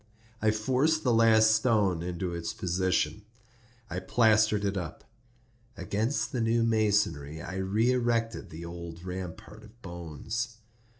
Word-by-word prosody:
I 110 - +3
forced 130 +9 +1
the 125 - +3
last 110 -1 +5
stone 105 -7 +2
into 90 0 -3
its 85 +5 -4
position; 95 0 0 0.7
I 90 -3 -4
plastered 110 0 +3
it 100 0 0
up. 85 -4 -5 0.7
Against 110 +8 -1
the 125 -5 -1
new 115 +1 +2
masonry 105 -10 +1
I 95 +5 -6
re 105 +6 +1
erected 120 -2 0
the 80 +2 -8
old 85 0 -8
rampart 90 -1 -7
of 115 +3 -17
bones. 90 - -5
105 Hz, 130 wpm, -29 LUFS, 90-115 Hz, 0.7 s, last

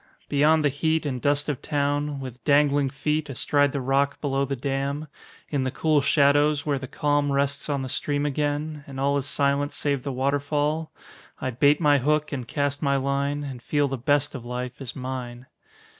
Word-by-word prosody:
Beyond 150 +2 +3
the - - +5
heat 160 +3 0
And 130 -4 -2
dust 145 0 +1
of 145 -2 -2
town, 145 0 -1
with 130 -2 -8
dangling 145 -1 +3
feet 150 +2 -1
Astride 145 +2 +2
the 140 - -2
rock 135 +2 +1
below 140 -1 0
the 140 0 -2
dam, 140 +3 -2 0.4
In 140 -3 0
the 130 - 0
cool 155 +2 +2
shadows 145 +1 +3
where 145 -2 0
the 130 - -6
calm 145 +1 +1
Rests 140 +1 0
on 140 -2 -1
the - - -4
stream 145 +3 -1
again, 150 +1 -2
and 135 -1 -7
all 140 +1 +2
Is 135 - -5
silent 140 0 +1
save 140 -2 -1
the 140 - -4
waterfall, 145 +4 0 0.5
I 130 - -2
bait 140 +4 +3
my 145 -3 +4
hook 150 +3 +1
and 130 -5 -4
cast 145 0 -1
my 140 -1 +2
line, 140 +2 -1
And 130 -4 -7
feel 145 +2 +1
the 135 - -2
best 145 +3 +1
of 130 -5 -6
life 125 +1 -5
is 125 -3 -6
mine. 125 -2 -6
140 Hz, 190 wpm, -25 LUFS, 135-145 Hz, 0.5 s, the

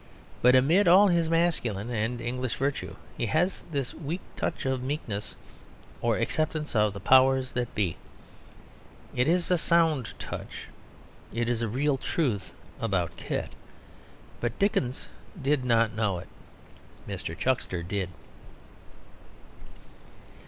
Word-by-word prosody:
But 125 +1 +6
amid 165 +10 +5
all 195 +4 +7
his 170 -2 +2
masculine 125 - 0
and 120 +2 -1
English 125 +1 -2
virtue, 140 +1 -2 0.2
he 120 - -1
has 175 - +1
this 140 -5 -2
weak 165 +4 -4
touch - - -3
of 130 -1 0
meekness, 125 -7 -4 0.7
or - - +2
acceptance 155 -2 -1
of 105 -2 +3
the 100 - -6
powers 130 +3 +4
that 120 -1 -2
be. 95 -6 0 1.2
It 125 +2 +2
is 175 +1 +2
a 180 - +4
sound 160 -8 +2
touch; - - -7 0.7
it 115 +1 -1
is 120 -1 0
a 115 - 0
real 135 +5 +1
truth 125 - -1 0.3
about 95 -7 -1
Kit. - - -4 0.9
But 120 0 -2
Dickens 140 -10 0 0.3
did 140 -1 +1
not 115 -3 +3
know 105 -4 0
it. 85 - -9 0.8
Mr. 95 -4 -5
Chuckster 100 -6 0
did. 95 +1 -2
130 Hz, 125 wpm, -28 LUFS, 110-155 Hz, 1.2 s, all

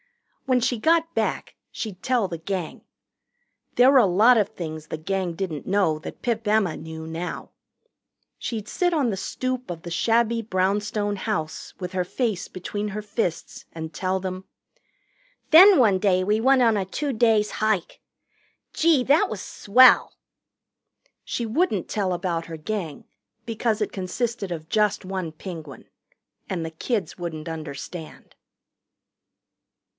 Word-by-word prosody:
When 255 -1 +3
she 245 -1 0
got 330 +5 +2
back, - - -2 0.2
she'd 200 -5 -6
tell 245 -6 +1
the 170 -3 -6
Gang. 175 -1 -4 0.9
There 250 +2 +6
were 275 - +7
a 235 - +5
lot 210 +7 +5
of 210 -3 +2
things 155 -6 -7
the - - -4
Gang 185 +2 -2
didn't 165 -5 -4
know 185 -6 +2
that - - -9
Pip 230 -2 -1
Emma 210 -5 +2
knew 160 0 -8
now. 165 +2 -5 0.9
She'd 220 -3 -4
sit 355 +5 0
on 280 -8 +1
the - - -2
stoop 255 +5 -3
of 170 -2 -6
the 170 - -7
shabby 230 +6 +2
brownstone 205 +1 0
house, 180 -6 -4
with 180 0 -5
her 185 -1 0
face 215 0 -2
between 205 +3 -4
her 210 +1 -4
fists, 200 -5 -3
and 160 -1 -7
tell 185 +3 -1
them: 185 0 -5 1.1
"Then, 370 +4 +9
one 210 -7 +4
day, 185 -2 +2
we 210 +3 +1
went 265 +1 +5
on 225 -2 +4
a 200 - 0
two 275 +9 -3
days' 220 -2 +3
hike. 215 -5 -1 0.7
Gee, 315 -5 +3
that 290 +5 +3
was 215 - -5
swell!" 250 +7 +4 1.1
She 235 - -3
wouldn't 230 - 0
tell 200 -4 -1
about 175 -2 -2
her 165 -1 -7
Gang, 165 -2 -5 0.4
because 225 -1 -1
it 210 - -1
consisted 200 +2 -3
of 160 -2 -5
just 210 0 +1
one 185 -3 -4
Penguin. 155 - -9 0.6
And 170 -3 -2
the 160 - -5
kids 200 +4 -3
wouldn't 165 -2 -5
understand. 160 +1 -8
200 Hz, 150 wpm, -24 LUFS, 175-230 Hz, 1.1 s, Then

